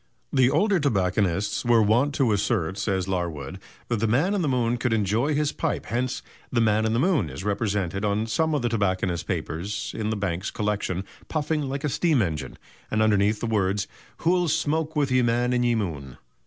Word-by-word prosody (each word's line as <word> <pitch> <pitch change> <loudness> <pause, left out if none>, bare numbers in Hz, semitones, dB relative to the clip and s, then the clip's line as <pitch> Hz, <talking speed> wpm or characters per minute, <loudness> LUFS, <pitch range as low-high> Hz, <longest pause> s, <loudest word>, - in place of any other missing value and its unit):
The 130 -2 +5
older 190 +7 +2
tobacconists 100 - 0
were 120 -2 +4
wont 125 +7 +2
to 130 -5 +2
assert, 95 -2 0
says 95 -3 -1
Larwood, 85 -3 -3 0.3
that 120 - 0
the 115 +2 0
man 145 - +2
in 200 - 0
the 160 - 0
moon 120 -2 +1
could 120 0 0
enjoy 110 +7 +1
his 150 0 +1
pipe, 160 - -2
hence 125 +3 -2 0.3
"the 125 - +1
'Man 110 -1 +3
in 110 - 0
the 115 - +1
Moon' 145 - +2
is 95 - -7
represented 100 -2 -1
on 105 +1 +1
some 155 +8 0
of 140 - -1
the 120 - +1
tobacconists' 95 -5 0
papers 90 +6 -3
in 110 -1 -2
the 110 - 0
Banks 95 -2 -2
Collection 100 -3 -2 0.2
puffing 150 -2 -1
like 140 +1 -4
a - - +1
steam 155 0 +2
engine, 80 -5 -4 0.3
and 110 0 +2
underneath 105 0 +2
the - - -1
words, 100 -3 0 0.3
'Who'll 175 +1 +2
smoake 160 0 0
with 145 -3 +1
ye 130 0 +4
Man 120 +1 +1
in 125 - +2
ye 120 -1 +2
Moone?'" 75 - -4
110 Hz, 195 wpm, -25 LUFS, 100-135 Hz, 0.3 s, The